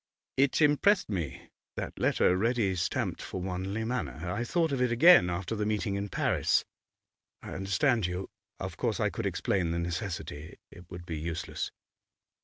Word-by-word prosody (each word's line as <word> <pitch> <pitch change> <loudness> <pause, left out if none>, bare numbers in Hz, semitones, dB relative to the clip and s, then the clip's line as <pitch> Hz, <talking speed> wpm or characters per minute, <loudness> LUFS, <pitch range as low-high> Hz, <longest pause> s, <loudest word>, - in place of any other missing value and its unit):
'It 140 +3 +3
impressed 185 +7 +4
me, 80 -9 -4 0.2
that - - -5
letter 90 - +3
ready 110 -1 +1
stamped 85 -2 -1
for 95 - -5
Wanley 95 +4 -3
Manor. 90 - -3
I 105 +5 -1
thought 165 +5 +1
of 135 -2 0
it 125 -1 +2
again 120 - +7
after 90 +5 -2
the 105 - -1
meeting 105 -1 -1
in 100 +1 -3
Paris.' - - +1 0.8
'I - - -7
understand 95 +3 +1
you. 90 +2 -4 0.3
Of - - -5
course - - -1
I - - +1
could - - -2
explain 90 -4 0
the 85 - -1
necessity. 85 -3 -4
It 85 -1 -14
would 85 0 -8
be 80 -3 -4
useless. 85 +1 -3
95 Hz, 165 wpm, -30 LUFS, 85-120 Hz, 0.8 s, again